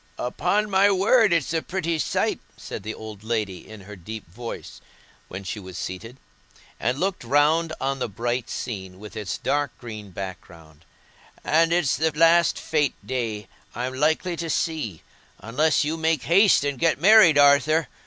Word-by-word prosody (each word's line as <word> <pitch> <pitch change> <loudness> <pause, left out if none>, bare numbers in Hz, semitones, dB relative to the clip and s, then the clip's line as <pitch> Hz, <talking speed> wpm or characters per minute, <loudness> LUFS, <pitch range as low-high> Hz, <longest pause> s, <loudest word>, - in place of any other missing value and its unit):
"Upon 210 +12 0
my 195 0 +4
word 205 +2 +4
it's 165 -3 +1
a 165 - 0
pretty 170 -3 -2
sight," - - 0 0.2
said - - -7
the 110 - -6
old 110 -2 -10
lady, 110 -5 -3
in 110 -2 -11
her 105 +2 -11
deep 105 +3 -9
voice, 115 +8 -8 0.5
when 95 +2 -7
she 100 +3 -5
was 95 -2 -9
seated, 105 +8 -6 0.6
and 125 +4 -1
looked 190 -3 -1
round 150 +6 +2
on 135 +1 -2
the 125 - -2
bright 120 +4 -3
scene 95 -5 -6
with 105 +1 -11
its 105 -6 -4
dark 145 +1 -1
green 110 -4 -9
background; 85 -4 -10 0.6
"and 165 +2 +3
it's 170 -8 +2
the 160 +3 +2
last 165 +1 +5
fête 150 -4 0
day 115 -5 -3 0.3
I'm 125 +2 -3
likely 160 +6 0
to 165 0 -4
see, 150 - -2 0.3
unless 145 +7 +1
you 155 +2 -2
make 160 -3 0
haste 190 -1 +4
and 140 -3 -2
get 165 -3 +2
married, 185 -4 +7
Arthur. 145 +3 +4
135 Hz, 165 wpm, -24 LUFS, 110-165 Hz, 0.6 s, married